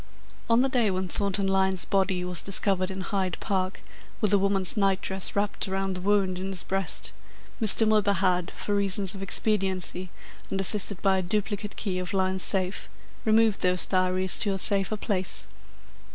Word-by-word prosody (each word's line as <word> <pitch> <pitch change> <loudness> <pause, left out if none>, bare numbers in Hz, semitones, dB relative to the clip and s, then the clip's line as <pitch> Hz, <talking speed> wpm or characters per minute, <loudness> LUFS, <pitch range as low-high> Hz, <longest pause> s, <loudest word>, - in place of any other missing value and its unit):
On 230 +1 +4
the 265 - +2
day 245 -5 +1
when 185 0 -2
Thornton 200 +2 -1
Lyne's 190 -1 0
body 190 -2 0
was 180 -1 +1
discovered 195 -1 +2
in 190 0 -6
Hyde 185 -2 -2
Park 190 -2 -3 0.4
with 210 -1 +1
a 200 - +4
woman's 195 -2 +1
night 195 -2 +1
dress 190 -1 -2
wrapped 205 0 -1
around 195 0 -2
the 180 - -6
wound 190 -2 0
in 190 - -4
his 190 -2 -3
breast, 195 -2 -3 0.5
Mr. 220 +1 +6
Milburgh 210 -2 +2
had, 180 -1 0
for 205 - -5
reasons 195 -1 +1
of 195 - -9
expediency 190 -2 -1 0.4
and 195 - -3
assisted 195 0 +3
by 190 -1 +2
a - - -1
duplicate 205 +2 -3
key 185 -3 -3
of 180 +1 -5
Lyne's 190 0 0
safe, 190 0 +2 0.4
removed 220 -1 +2
those 180 -1 +2
diaries 185 0 0
to 200 -4 -1
a - - -3
safer 200 +2 +2
place. 190 -4 -1
195 Hz, 175 wpm, -26 LUFS, 185-205 Hz, 0.5 s, Mr